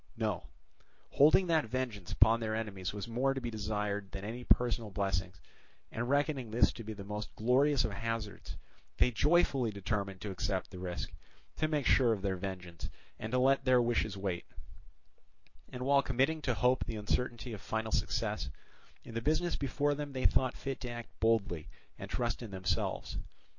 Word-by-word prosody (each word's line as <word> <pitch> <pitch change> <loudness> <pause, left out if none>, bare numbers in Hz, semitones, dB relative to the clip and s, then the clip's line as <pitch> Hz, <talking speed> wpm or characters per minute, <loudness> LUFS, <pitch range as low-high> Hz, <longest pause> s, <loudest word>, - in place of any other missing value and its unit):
No, - - -1 0.6
holding 155 +6 +6
that 165 -5 +3
vengeance 110 -6 -3
upon 110 +2 +5
their 110 -1 -1
enemies 100 -5 -3
was 105 +2 -5
more 130 +4 +1
to - - -1
be 120 -2 -4
desired 105 -2 -2
than 100 0 -6
any 120 +3 -5
personal 120 -3 +2
blessings, 95 -2 -1 0.5
and 120 +2 -2
reckoning 140 -3 +1
this 115 +3 +4
to 115 - -8
be 110 0 -5
the 100 -2 -8
most 105 +2 -4
glorious 125 +2 +3
of 110 - -3
hazards, 105 -3 -4 0.4
they 125 - +4
joyfully 140 -1 +3
determined 100 -1 -2
to 105 - -4
accept 95 0 -2
the 90 - -8
risk, 90 -1 -4 0.4
to 155 - +2
make 150 -3 0
sure 120 -4 +5
of 100 -3 -5
their 95 -1 +1
vengeance, 90 -3 -6 0.3
and 110 - -5
to 125 - +2
let 135 +2 +4
their 130 -2 +5
wishes 115 -4 +1
wait; 95 -3 -3 1.2
and 125 0 -5
while 140 0 +5
committing 135 +5 +1
to 125 -4 0
hope 125 +2 +3
the 115 - -4
uncertainty 120 +3 -1
of 105 - -7
final 110 +1 -2
success, 110 -2 0 0.5
in 115 - -10
the 115 - -2
business 160 +6 +1
before 145 +1 +1
them 145 -1 -5
they 130 - -2
thought 130 -1 +3
fit 135 -1 -4
to 125 - -4
act 120 -1 -6
boldly 100 -8 +1 0.3
and - - -6
trust 120 0 -1
in 115 - -6
themselves. 95 -2 -2
115 Hz, 180 wpm, -33 LUFS, 100-130 Hz, 1.2 s, holding